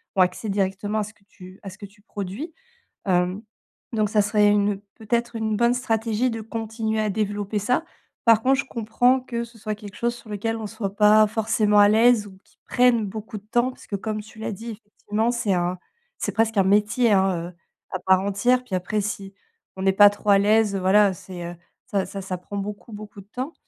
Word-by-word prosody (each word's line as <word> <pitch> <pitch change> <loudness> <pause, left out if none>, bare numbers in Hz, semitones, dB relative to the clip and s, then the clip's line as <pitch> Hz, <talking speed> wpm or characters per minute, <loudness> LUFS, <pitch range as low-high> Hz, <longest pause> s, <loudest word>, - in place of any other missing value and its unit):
ont 190 - +4
accès 180 +4 +1
directement 200 +2 -1
à - - 0
ce 210 - -8
que 210 - -31
tu 185 -1 -14
à 195 - -7
ce 190 - -13
que 200 - -8
tu 205 +1 -25
produis. 210 - -6 0.5
Hem, 180 +1 +1 0.5
donc 215 -2 +1
ça 210 0 +3
serait 210 0 +3
une, 205 -1 +2 0.2
peut-être, 235 +2 -2
une 220 -1 -1
bonne 235 +2 +3
stratégie 225 0 0
de 225 -1 -4
continuer 220 0 -3
à 215 - 0
développer 205 0 -2
ça. 250 +10 0 0.4
Par 225 -2 +6
contre, 265 +3 +3
je - - -14
comprends 245 +2 +2
que 235 -2 -4
ce 235 0 -17
soit 215 0 -3
quelque 205 -1 -11
chose 235 +2 -1
sur 230 -2 -14
lequel 225 +2 -2
on 220 - -5
soit 205 -2 -5
pas 215 +1 +6
forcément 215 -1 +1
à 205 0 +7
l'aise 225 0 +4
ou 190 -1 -14
qui - - -30
prenne 245 -3 +3
beaucoup 215 +2 -6
de 200 - -11
temps, 240 +2 +2
parce - - -16
que, 200 - -3
comme 215 +2 -3
tu 220 +1 -15
l'as 220 - -3
dit, 225 +4 -7
effectivement 215 +1 -3
c'est 235 -5 0
un 180 0 0 0.4
c'est - - -2
presque 225 -1 +1
un 195 - +5
métier, 210 +5 +3
hein, 190 -3 +1
heu, - - -24 0.4
à 185 - -3
part 190 +1 +3
entière. 200 +6 +1
Puis 235 - -11
après 185 +4 -1
si 195 -1 -5 0.4
on 190 - -3
est 195 - +4
pas 205 +1 +8
trop 205 0 -1
à 200 - +6
l'aise, 210 0 +3
heu, - - -1
voilà 195 +1 +4
c'est 180 0 -9
heu, 175 +1 -6 0.3
ça 200 -6 0
ça 195 - -6
ça 185 -1 -4
prend 200 +3 -7
beaucoup, 205 +3 -6
beaucoup 205 -1 -9
de 195 - -20
temps. 260 +6 -4
210 Hz, 225 wpm, -24 LUFS, 195-225 Hz, 0.5 s, pas